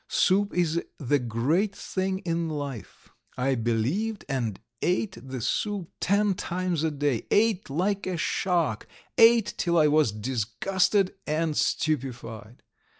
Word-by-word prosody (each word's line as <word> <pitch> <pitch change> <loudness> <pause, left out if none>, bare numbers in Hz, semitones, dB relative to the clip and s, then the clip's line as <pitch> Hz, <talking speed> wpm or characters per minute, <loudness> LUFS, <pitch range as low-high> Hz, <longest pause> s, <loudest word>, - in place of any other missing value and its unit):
Soup 200 +2 +2
is 170 -1 +1 0.2
the 145 0 +1
great 140 - 0
thing 190 -1 -3
in 165 -1 -1
life!' 140 -6 -6 0.3
I 135 +2 +1
believed, 130 - -1
and 120 -8 -2 0.2
ate 185 +3 0
the 130 -2 -6
soup 195 - -2
ten 200 +1 +2
times 180 -2 -2
a 160 - +2
day, 145 -5 -1
ate 210 -4 +2
like 190 +8 -1
a 185 -2 -2
shark, 165 - 0 0.3
ate 230 -1 +6
till 170 -1 +1
I 155 - +5
was 150 -5 +3
disgusted 130 - 0
and 155 0 0
stupefied. 120 -8 -2
160 Hz, 130 wpm, -27 LUFS, 130-190 Hz, 0.3 s, ate